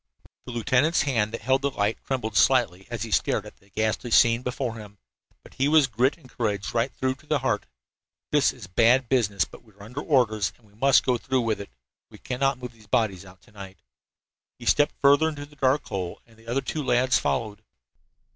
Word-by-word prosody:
The - - -5
lieutenant's 130 +7 +2
hand 115 -7 0
that 115 - -6
held 130 +3 +2
the 140 - +1
light 105 -4 -1
trembled 125 -5 -3
slightly 95 -3 +3
as 120 -3 -4
he 115 - -7
stared - - +1
at - - -12
the 100 - -26
ghastly 110 +4 -2
scene 115 +1 +5
before 125 -1 -3
him, 105 -2 -11 0.5
but - - -16
he 135 - 0
was 155 -1 +5
grit 125 +4 +1
and 150 -6 -18
courage 105 -5 -3
right 120 +3 0
through 130 0 0
to 145 +3 -21
the 150 - +2
heart. 115 -6 -1 0.6
"This 145 -2 +3
is 125 -6 -11
bad 115 +6 +3
business," 105 -8 +2
he - - -5
said, - - -24
"but - - -14
we 110 -3 -22
are 100 +1 -15
under 125 +7 -6
orders 110 -10 +1
and 120 - -27
we 100 - -24
must 135 +5 +3
go 125 -2 +1
through 130 +1 0
with 110 -3 -1
it. 100 - -9 0.4
We - - -14
cannot 135 +1 -1
move 125 -1 -8
the 110 -2 -20
bodies 100 -4 0
out 95 -1 -16
to - - -22
night." 95 -2 -11 0.7
He - - -11
stepped 145 0 +3
further 145 +3 +5
into 145 -2 -7
the 145 +1 -19
dark 135 +1 +1
hole, 90 -3 -4
and 115 - -22
the 115 +1 -21
other 125 +4 0
two 155 - -4
lads 125 -1 +2
followed. 110 -3 -2
120 Hz, 220 wpm, -25 LUFS, 105-135 Hz, 0.7 s, scene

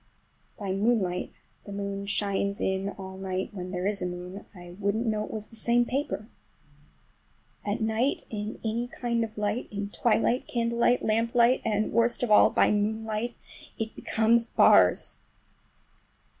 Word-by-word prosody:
By 200 -2 -4
moonlight—the 195 -1 -2
moon 200 0 -4
shines 200 0 0
in 190 +1 -1
all 190 -1 -8
night 190 0 -3
when 185 -2 -6
there 180 0 -3
is 200 -1 0
a 180 - -1
moon—I 180 0 -9
wouldn't 205 +3 0
know 215 -2 0
it - - -11
was 215 -1 -6
the 225 - -14
same 235 +2 +2
paper. 250 -4 -3 1.4
At 210 +3 -2
night 220 +5 0
in 210 0 -5
any 230 +2 -1
kind 235 -1 -1
of 220 -1 -7
light, 210 +3 -1
in 205 -1 -4
twilight, 235 +3 +1
candlelight, 235 +1 +1
lamplight, 235 +3 +3
and 215 -1 0
worst 235 +1 +3
of 240 - 0
all 210 - +7
by - - +3
moonlight, 220 +2 -1 0.4
it 225 0 -4
becomes 230 +1 +2
bars! - - +4
215 Hz, 145 wpm, -27 LUFS, 200-235 Hz, 1.4 s, all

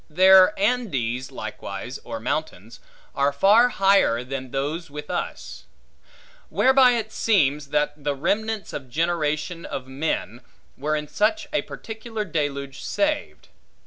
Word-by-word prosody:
Their 190 +4 +6
Andes, 135 - -1
likewise, 110 +3 -6
or 115 -1 -6
mountains, 115 - -4 0.3
are 140 +1 +2
far 205 +12 +5
higher 195 - +3
than 130 0 -6
those 145 +6 -3
with 150 +2 -7
us; 180 - -5 0.8
whereby 260 -1 +5
it 220 -2 -2
seems, 150 -12 +1
that 150 0 -1
the 145 -1 0
remnants 210 +8 -2
of 135 -3 -6
generation 160 +2 -1
of 130 - -5
men, 130 -4 -3 0.3
were 150 +3 -1
in 150 0 -3
such 295 - 0
a - - +2
particular 220 -1 -6
deluge 140 -5 -3
saved. 300 0 -2
150 Hz, 125 wpm, -24 LUFS, 135-205 Hz, 0.8 s, Their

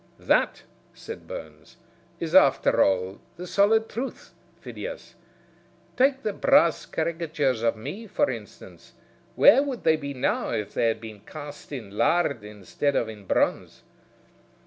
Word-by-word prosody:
"That," - - +1 0.3
said 455 - -9
Burns, - - -10 0.4
"is, 165 -1 -4
after 135 -9 +5
all, 95 0 0 0.2
the 180 - -7
solid 215 +4 +3
truth, 255 +4 -6 0.3
Phidias. - - -8 0.8
Take 270 +1 +2
the 210 - -1
brass 170 -3 +3
caricatures 155 -7 -1
of 115 0 +1
me, 200 - -7
for 250 +9 +1
instance. - - -11 0.4
Where 275 - +7
would 275 -4 -4
they 160 -1 +4
be 140 -2 -6
now 130 - -1
if 105 - -3
they 115 - +1
had 115 -1 -1
been 110 -2 -9
cast 145 +7 -10
in 120 -8 -7
lard 140 -5 +1
instead 105 +7 -3
of 115 - 0
in 105 -2 -10
bronze?" - - -1
150 Hz, 140 wpm, -25 LUFS, -, 0.8 s, Where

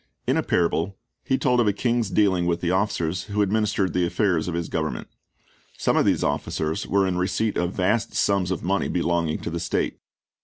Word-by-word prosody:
In - - +2
a - - +2
parable 85 +2 0 0.3
He 130 -2 +1
told 125 -2 +2
of 120 - +3
a 100 - +3
king's 115 0 0
dealing 95 -4 +2
with 85 0 +1
the 85 0 -1
officers 90 -3 0
who 105 -1 0
administered 100 -2 0
the 90 - +1
affairs 85 -2 +1
of 85 - -2
his 85 -1 -2
government. 80 -1 -3 0.7
Some - - +1
of - - +3
these - - +2
officers 75 +5 -2
were 100 0 +2
in 90 -1 -1
receipt 105 +4 0
of 90 +1 -1
vast 105 +5 0
sums 100 -3 +1
of 95 - -3
money 95 +2 0
belonging 85 -2 0
to - - -3
the 85 - -3
state. - - -2
95 Hz, 200 wpm, -24 LUFS, 85-105 Hz, 0.7 s, of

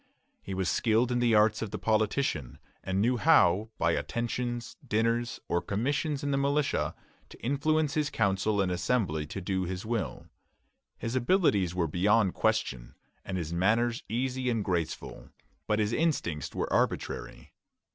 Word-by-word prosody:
He 95 - -5
was 95 -1 -1
skilled 115 +5 +2
in 120 - +1
the 120 -2 +3
arts 105 0 +4
of 110 - -3
the - - -4
politician, 110 - 0 0.3
and 95 +1 -1
knew 120 +4 +2
how, 110 - +4
by - - +2
attentions, 120 0 -3
dinners, 115 +2 0
or 85 - +1
commissions 140 +7 -1
in 145 - -1
the 135 - +1
militia, 140 +1 0 0.3
to - - -14
influence 145 +3 +1
his 150 -2 0
Council 100 0 +1
and 95 -2 0
Assembly 90 -5 0
to 95 - -5
do 95 0 -1
his 90 +2 -5
will. 115 -2 -3 0.7
His 115 +2 -4
abilities 120 - +2
were 90 -2 +1
beyond 100 +4 +2
question, 105 - -1 0.3
and 95 - -4
his 85 -2 -4
manners 115 +7 +2
easy 125 +2 -1
and 115 -4 -1
graceful; 85 -4 -3 0.4
but 105 - +2
his 105 +1 0
instincts 120 - -1
were - - -2
arbitrary. - - -2
110 Hz, 155 wpm, -29 LUFS, 95-125 Hz, 0.7 s, arts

